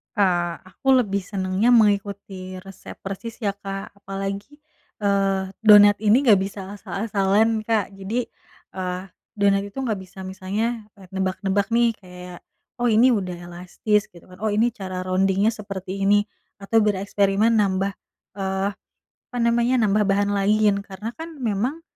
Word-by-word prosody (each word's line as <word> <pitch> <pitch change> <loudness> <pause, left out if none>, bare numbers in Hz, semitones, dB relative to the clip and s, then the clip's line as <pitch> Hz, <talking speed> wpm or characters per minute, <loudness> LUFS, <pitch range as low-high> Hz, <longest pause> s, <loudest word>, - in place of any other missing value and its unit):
Kak, 175 -4 +1
aku 185 +8 -12 0.2
lebih 200 -2 -1
senangnya 190 +3 0
mengikuti 200 -3 +1
resep 195 -1 -11
persis 195 +4 -6
ya 200 - +2
Kak, 195 0 -7
apalagi, 195 +8 -6 0.4
eee, 195 -1 +1 0.2
donat 205 -2 +7
ini 220 +6 +4
nggak 205 -4 +7
bisa 195 +1 -4 0.2
asal-asalan 205 +2 +1
Kak, 220 -3 0
jadi, 200 +5 -3 0.5
eee, 180 -1 -3 0.4
donat 200 -1 +3
itu 200 - -18
nggak 220 -6 -1
bisa 190 +1 -11
misalnya 210 +4 -3 0.3
nebak-nebak 190 +1 -1
nih 235 0 +3
kayak, 180 -1 -11 0.4
"Oh 240 - +3
ini 235 +3 +5
udah 185 -5 -2
elastis." 180 +4 -2
gitu 170 -1 -17
kan, 180 0 -16
"Oh 220 - +1
ini 220 +3 +2
cara 185 -4 -5
rounding-nya 190 +3 +2
seperti 195 -2 -5
ini." 205 +1 +4 0.3
atau 210 +3 +2
bereksperimen 200 +1 +2
nambah, 195 -2 +1 0.4
eee, 190 0 -1 0.4
apa 245 - -12
namanya, 235 +2 +2
nambah 210 0 +2
bahan 200 +1 +2
lain, 205 +1 +2
karena 205 +2 -6
kan, 325 +1 -7
memang, 240 +8 -1
200 Hz, 140 wpm, -23 LUFS, 190-215 Hz, 0.5 s, donat